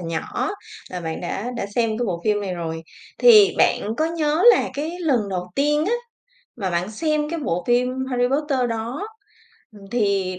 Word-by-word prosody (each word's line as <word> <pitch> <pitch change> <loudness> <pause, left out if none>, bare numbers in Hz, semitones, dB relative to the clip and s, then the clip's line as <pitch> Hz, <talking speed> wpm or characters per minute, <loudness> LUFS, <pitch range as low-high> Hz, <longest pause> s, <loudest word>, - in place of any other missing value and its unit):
nhỏ 165 - -3 0.4
là 180 - -5
bạn 160 -1 -4
đã 200 +6 -4
đã 200 - -3
xem 230 -2 +1
cái 240 - -1
bộ 175 -3 -2
phim 210 -1 +2
này 190 -2 -3
rồi, 165 -1 -5 0.4
thì 430 -5 +7
bạn 215 +2 +2
có 310 - +1
nhớ 320 0 0
là 400 - +1
cái 300 +3 -3
lần 255 -11 +1
đầu 180 -1 -4
tiên 295 +2 +2
á, 440 - +1 0.6
mà 195 -5 -3
bạn 180 +4 -2
xem 305 +4 -1
cái 335 0 -3
bộ 180 - -2
phim 250 +2 +1
Harry 245 -1 +1
Potter 280 0 0
đó, 235 - -4 0.7
ừm, 205 -2 -15
thì 200 -5 0
235 Hz, 185 wpm, -22 LUFS, 185-295 Hz, 0.7 s, thì